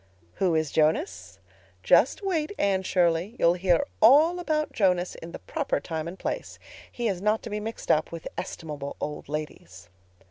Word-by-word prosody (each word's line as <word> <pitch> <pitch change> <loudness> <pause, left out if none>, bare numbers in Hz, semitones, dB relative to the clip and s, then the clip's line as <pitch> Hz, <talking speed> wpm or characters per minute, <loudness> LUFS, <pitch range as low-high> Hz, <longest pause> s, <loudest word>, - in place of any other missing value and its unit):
"Who 180 -4 +3
is 155 -2 0
Jonas? 160 - 0 0.5
Just - - +4
wait, 345 -3 -1
Anne 195 -1 +1
Shirley. 180 +2 +1
You'll 170 - +4
hear 180 +6 +2 0.2
all 300 +10 +6
about 310 -3 -1
Jonas 180 -4 +1
in 165 - -10
the - - -6
proper 300 -4 -2
time 160 -1 -4
and 175 +3 -7
place. - - -4 0.3
He 240 -1 -2
is 190 -4 -2
not 210 +2 +1
to 225 - -7
be 210 - -2
mixed 225 +2 -3
up 155 0 +1
with 165 -1 -7
estimable 150 -6 -6
old 150 -1 -5
ladies. 95 - -7
185 Hz, 170 wpm, -26 LUFS, 160-230 Hz, 0.5 s, all